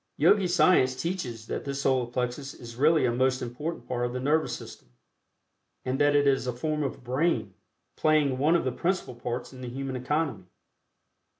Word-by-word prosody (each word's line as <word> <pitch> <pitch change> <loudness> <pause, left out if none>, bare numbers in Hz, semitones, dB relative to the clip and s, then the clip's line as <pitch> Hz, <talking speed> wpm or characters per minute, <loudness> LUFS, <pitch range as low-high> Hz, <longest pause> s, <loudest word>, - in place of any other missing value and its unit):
Yogi 200 -3 +4
science 160 -6 +4
teaches 130 - -3
that - - -4
this 140 0 -3
Solar 130 -2 +2
Plexus 125 +3 -3
is 115 -1 -10
really 150 +3 +4
a 120 - +2
most 130 +2 +1
important 140 +8 -5
part 120 -1 -2
of 120 0 -2
the 125 - -2
Nervous 150 +4 +1
System, - - -12 1.0
and 130 +1 -1
that 145 0 +4
it 145 0 +4
is 135 -2 +2
a 125 - -1
form 150 +5 -2
of 135 -3 -4
brain, 125 - 0 0.4
playing 150 -4 +2
one 155 +5 +4
of 170 - +2
the 130 - 0
principal 170 +1 -1
parts 120 +2 -5
in 130 - -11
the 125 - -5
human 135 +1 -4
economy. 140 - -1
130 Hz, 185 wpm, -27 LUFS, 125-155 Hz, 1.0 s, Yogi